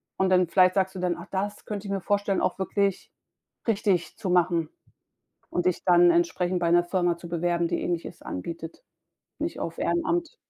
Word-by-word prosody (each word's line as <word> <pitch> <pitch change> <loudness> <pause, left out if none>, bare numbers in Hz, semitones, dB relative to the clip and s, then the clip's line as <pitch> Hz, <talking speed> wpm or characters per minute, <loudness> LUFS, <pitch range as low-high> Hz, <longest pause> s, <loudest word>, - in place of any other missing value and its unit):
und 190 0 +1
dann 185 -1 +4
vielleicht 185 +2 +4
sagst 190 -1 +1
du - - -5
dann: 180 -1 0
„Ach, - - -10
das 205 +2 -3
könnte 205 -1 -5
ich - - -4
mir 195 - 0
vorstellen, 200 -1 0
auch - - 0
wirklich 195 0 -1 0.6
richtig 195 -6 0
zu 200 -5 -4
machen“, 175 -3 +2 0.8
und 175 0 0
dich 180 - 0
dann 175 -1 +6
entsprechend 175 +1 +1
bei 170 -1 +1
'ner 175 0 +5
Firma 175 -2 0
zu 170 - -10
bewerben, 170 0 0
die - - -2
Ähnliches 170 -1 -3
anbietet, 165 - -7 0.6
nicht - - -3
auf - - -4
Ehrenamt. 345 +5 0
180 Hz, 185 wpm, -26 LUFS, 175-195 Hz, 0.8 s, dann